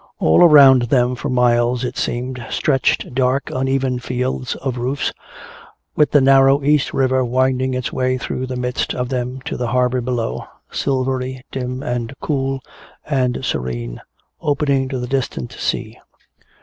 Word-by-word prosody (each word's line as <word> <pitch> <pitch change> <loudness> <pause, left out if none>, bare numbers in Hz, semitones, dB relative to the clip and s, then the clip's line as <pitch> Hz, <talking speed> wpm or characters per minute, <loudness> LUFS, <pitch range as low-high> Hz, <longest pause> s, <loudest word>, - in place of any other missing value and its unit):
All 80 - +4
around 140 -6 +8
them 125 -2 +3
for 135 +3 -4
miles, 120 0 +2
it 125 - -3
seemed, 125 +1 -3
stretched 135 -3 0
dark 130 +2 0
uneven 130 -1 0
fields 125 +1 -3
of 130 -2 -4
roofs, 130 +3 -2 0.8
with 150 - +3
the 145 - +5
narrow 135 +1 +5
East 145 -1 +2
River 130 -1 +1
winding 130 +1 +1
its 125 0 -3
way 130 0 0
through 130 0 -4
the 130 - -4
midst 125 0 -2
of 125 -1 -2
them 125 0 -3
to - - -5
the 120 - -2
harbor 125 +1 +1
below, 120 -2 -3 0.2
silvery, 130 -1 -2
dim 125 0 -4
and 120 +1 -3
cool 135 -2 -2 0.4
and 130 -3 -1
serene, - - -3 0.4
opening 140 -2 +1
to 130 - -3
the 125 - -3
distant 125 - -3
sea. - - -3
130 Hz, 150 wpm, -19 LUFS, 125-135 Hz, 0.8 s, around